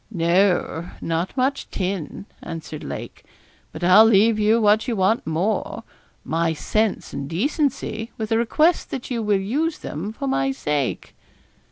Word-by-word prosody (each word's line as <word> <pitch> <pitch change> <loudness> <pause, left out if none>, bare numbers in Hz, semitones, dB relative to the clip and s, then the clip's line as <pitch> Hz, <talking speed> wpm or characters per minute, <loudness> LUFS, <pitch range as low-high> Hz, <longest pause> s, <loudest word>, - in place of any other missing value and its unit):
'No, 175 -2 +1
not 165 +8 -2
much 265 +2 0
tin,' 190 -1 -4 0.2
answered 160 -2 -7
Lake; - - -7 0.5
'but - - -8
I'll 185 +5 +8
leave 220 0 +4
you 215 +2 +3
what 215 +2 +3
you 240 - 0
want 195 +2 +1
more, 185 +6 -1 0.4
my 165 +1 0
sense 215 +6 -1
and 140 0 -5
decency, 230 - -1
with 220 -1 -4
a 225 - +3
request 310 +9 +2
that 265 -1 -6
you 235 -2 -1
will 210 -2 +2
use 295 +12 -1
them 175 +8 -5
for 220 - -6
my 135 0 +1
sake.' 140 -1 -2
205 Hz, 150 wpm, -22 LUFS, 165-225 Hz, 0.5 s, I'll